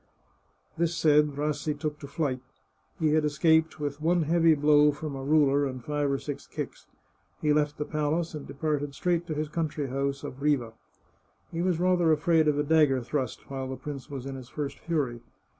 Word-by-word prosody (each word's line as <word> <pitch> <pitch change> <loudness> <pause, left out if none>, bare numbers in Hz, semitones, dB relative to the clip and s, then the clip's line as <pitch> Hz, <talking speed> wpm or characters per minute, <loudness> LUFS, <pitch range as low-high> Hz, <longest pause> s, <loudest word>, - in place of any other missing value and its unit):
This 170 0 +1
said, 150 -3 +3
Rassi 150 0 -1
took 150 0 -4
to 140 - -8
flight. 140 -3 -1 0.6
He 155 -2 +2
had 155 0 +3
escaped 160 +2 +2
with 145 0 -4
one 170 +1 +2
hearty 165 +1 +4
blow 150 0 +5
from 150 0 -6
a 135 - -5
ruler 145 -1 +3
and 130 -2 -6
five 145 -1 0
or 140 - +1
six 145 0 -6
kicks. - - -6 0.5
He 150 -1 +2
left 150 -1 +1
the 150 - -2
palace 155 +3 -1
and 150 -2 -7
departed 145 -1 -2
straight 175 +1 0
to 155 - -3
his 155 +1 -1
country 155 -3 -2
house 140 +1 -2
at 140 -1 -7
Riva. 135 -6 +1 0.8
He 165 - -2
was 180 -2 +1
rather 175 -2 +3
afraid 155 +1 +3
of 150 -1 +2
a 145 - +2
dagger 145 -4 +3
thrust 130 -1 -3
while 135 -1 -3
the 130 - -4
prince 140 -4 -7
was 135 -3 -6
in 135 - -5
his 130 -2 -9
first 145 -2 -5
fury. 140 -8 -2
150 Hz, 190 wpm, -28 LUFS, 140-160 Hz, 0.8 s, blow